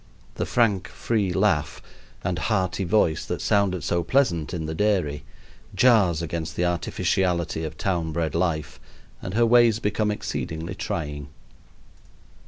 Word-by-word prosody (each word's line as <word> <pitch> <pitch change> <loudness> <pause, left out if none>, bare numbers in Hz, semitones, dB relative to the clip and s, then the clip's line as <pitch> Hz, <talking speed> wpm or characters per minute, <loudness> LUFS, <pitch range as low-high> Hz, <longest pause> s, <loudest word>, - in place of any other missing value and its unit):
The - - -3
frank, 105 -6 +2
free 105 -5 -1
laugh 90 -6 +1 0.4
and 90 -3 -1
hearty 95 -1 0
voice 85 -3 +2
that - - -3
sounded 95 -5 +1
so 85 0 0
pleasant 85 - +1
in 85 -3 -3
the 80 - -3
dairy 85 -6 0 0.5
jars 100 -9 +4
against 80 0 -4
the 90 - 0
artificiality 85 -1 0
of 75 -1 -6
town 85 -4 -1
bred 80 0 -2
life, 85 -3 -1 0.4
and 90 - -5
her 115 +1 +4
ways 120 -2 +5
become 105 -1 0
exceedingly 85 -4 -4
trying. 75 -6 -4
90 Hz, 135 wpm, -24 LUFS, 80-105 Hz, 0.5 s, ways